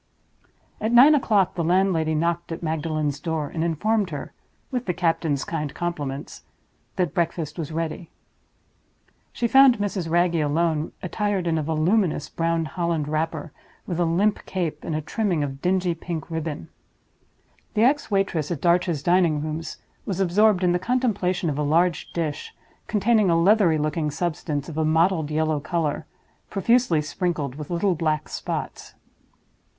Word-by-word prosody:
At 220 +2 -1
nine 255 +6 +8
o'clock 215 -9 +2
the 170 - -2
landlady 170 -2 +2
knocked 170 +2 -1
at 165 - -5
Magdalen's 155 -2 -1
door, 160 -3 -2
and 160 - -1
informed 200 +5 0
her 145 -4 -6 0.4
(with 250 -4 -3
the 180 - 0
captain's 165 -5 0
kind 150 -4 -3
compliments) 145 -5 -4 0.5
that 175 -6 0
breakfast 170 -1 -2
was 160 -1 -4
ready. 165 +1 -4 1.2
She 235 - -1
found 265 0 +6
Mrs. 195 -4 -2
Wragge 175 +1 +2
alone, 155 +1 0
attired 200 0 -1
in 165 -1 +1
a - - 0
voluminous 160 +1 +1
brown 165 0 0
holland 170 -2 -2
wrapper, 155 0 -2 0.3
with 175 -2 -3
a 175 - +3
limp 195 +6 +1
cape 175 -5 -3
and 160 - -3
a 155 - -1
trimming 175 -1 -1
of 135 -1 -5
dingy 180 -1 +1
pink 165 -1 -6
ribbon. 160 - -4 1.1
The 215 - +3
ex 285 +4 +2
waitress 195 -7 0
at 170 - -3
Darch's 170 -3 +1
Dining 175 -4 +3
rooms 155 +1 -5 0.3
was 190 -2 -2
absorbed 195 +1 +3
in 180 - +3
the 175 - +1
contemplation 200 -6 0
of 150 -2 -1
a - - +1
large 165 +3 +1
dish, 160 -4 -4 0.3
containing 215 -1 +2
a 165 -1 +3
leathery 185 -3 +4
looking 150 +1 -1
substance 150 -2 -3
of 160 -2 -5
a - - +2
mottled 160 0 +2
yellow 155 0 0
color, 155 0 -2 0.4
profusely 205 -5 +2
sprinkled 150 -3 -2
with 150 +1 -8
little 180 +2 +1
black 155 -2 -1
spots. - - -5
170 Hz, 155 wpm, -24 LUFS, 155-185 Hz, 1.2 s, nine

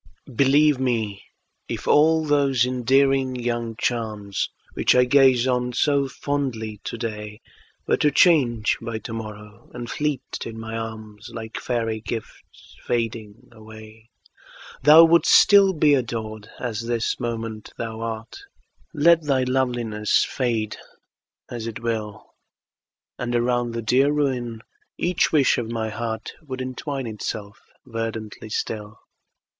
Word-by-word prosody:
Believe 140 +2 +4
me, 110 -6 -1 0.5
if - - -5
all 160 +1 +4
those 140 -4 +2
endearing 130 +1 +2
young 120 -2 -3
charms, 105 -5 -2 0.2
Which - - +2
I 125 - +6
gaze 130 -1 +4
on 125 -1 0
so 140 +1 +2
fondly 125 -7 -3
today, 105 -2 -5 0.5
Were - - +2
to 150 - +3
change 135 -9 +3
by 115 -1 -4
to 110 - -7
morrow, 105 -2 -9
and 120 -1 -6
fleet 150 -3 -1 0.2
in 115 -1 -7
my 110 0 -6
arms, 110 -2 -7
Like 110 -1 -6
fairy 115 -3 -2
gifts 115 0 -8
fading 115 -3 -3
away, 110 0 -14 0.7
Thou 155 +3 +9
wouldst 165 +1 +4
still 200 -2 +7
be 150 -4 +3
adored, 110 -5 -3
as 115 -3 -3
this 120 -1 -1
moment 115 -3 -5
thou 115 -1 -5
art. 115 - -5 0.6
Let 165 +3 +5
thy 135 -3 +2
loveliness 120 -5 +1
fade 115 -5 -2 0.7
as 115 -2 -6
it 115 - -6
will. 110 -2 -4 0.9
And 120 -1 -2
around 120 0 0
the 115 - -3
dear 130 +6 +3
ruin 125 -6 -1 0.3
each 175 0 +1
wish 145 -6 +3
of 115 -2 -4
my 115 -1 -2
heart 110 +1 -5
Would 130 -4 -7
entwine 130 +1 -4
itself 105 -2 -6 0.2
verdantly 115 -1 -5
still. 105 0 -4
120 Hz, 130 wpm, -23 LUFS, 110-130 Hz, 0.9 s, Thou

